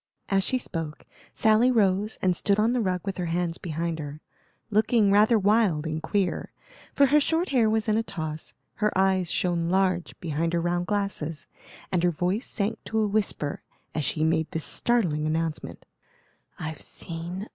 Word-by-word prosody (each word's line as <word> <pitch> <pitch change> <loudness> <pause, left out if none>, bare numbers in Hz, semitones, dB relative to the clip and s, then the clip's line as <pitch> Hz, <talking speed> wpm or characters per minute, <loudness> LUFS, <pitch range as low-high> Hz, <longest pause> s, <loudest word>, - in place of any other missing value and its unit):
As 195 -1 +2
she 255 - 0
spoke, 165 -10 -5 0.3
Sally 220 +3 +4
rose 210 -3 +2
and 185 -1 +3
stood 200 +3 +1
on 225 +3 +3
the 250 - +1
rug 185 -3 0
with 195 -1 -3
her 180 -2 -2
hands 170 0 -1
behind 165 0 -3
her, 145 0 -6 0.5
looking 215 0 +3
rather 215 +3 +5
wild 200 -6 +2
and 160 0 -3
queer; 190 +3 -1 0.4
for 280 - +6
her 290 +3 +5
short 325 +4 0
hair 240 -5 +3
was 220 0 0
in 215 0 +2
a - - +3
toss, 160 -7 -6 0.2
her 210 0 +1
eyes 190 -2 +2
shone 170 -2 0
large 185 -2 0
behind 165 0 -1
her 170 - +2
round 175 +1 -1
glasses, 175 -8 -2 0.5
and 180 - +2
her 175 - +3
voice 180 - -1
sank 220 +1 -2
to 220 - -3
a 215 -1 +3
whisper 200 -8 -1 0.3
as 155 - -1
she 155 +3 -1
made 160 -1 +1
this 160 -2 -4
startling 165 - 0
announcement: 160 0 -3 0.7
"I've 155 -2 -6
seen 165 +1 -5
a - - -4
ghost!" 210 - -8
185 Hz, 180 wpm, -26 LUFS, 165-215 Hz, 0.7 s, for